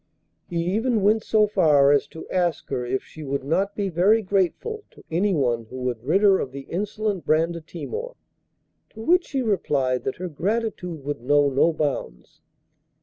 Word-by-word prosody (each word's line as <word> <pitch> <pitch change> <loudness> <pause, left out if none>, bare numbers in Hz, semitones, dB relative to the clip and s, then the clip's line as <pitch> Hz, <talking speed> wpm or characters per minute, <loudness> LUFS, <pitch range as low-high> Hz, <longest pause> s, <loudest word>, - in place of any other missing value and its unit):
He 170 -1 -1
even 225 -2 +1
went 215 +2 +3
so 215 -1 +3
far 155 -9 +4
as 145 0 +3
to 160 - -10
ask 175 -4 0
her 130 -2 -2
if 130 +2 -2
she 155 - -12
would 140 -1 -3
not 195 +8 0
be 200 -1 -1
very 195 +6 +3
grateful 200 - -1
to - - -18
anyone 145 - +1
who 125 +4 -10
would 125 -3 -3
rid 175 +10 +2
her 195 -2 +6
of 130 - -3
the 140 +1 -7
insolent 205 0 -2
Brandatimor. 170 - -2 0.8
To - - -11
which 355 +7 +3
she 270 -3 -1
replied 140 - 0
that 135 - -2
her 185 - -5
gratitude 180 -2 -3
would 145 -4 -3
know 145 +2 +3
no 140 +5 +3
bounds. 145 - -4
170 Hz, 170 wpm, -24 LUFS, 140-210 Hz, 0.8 s, her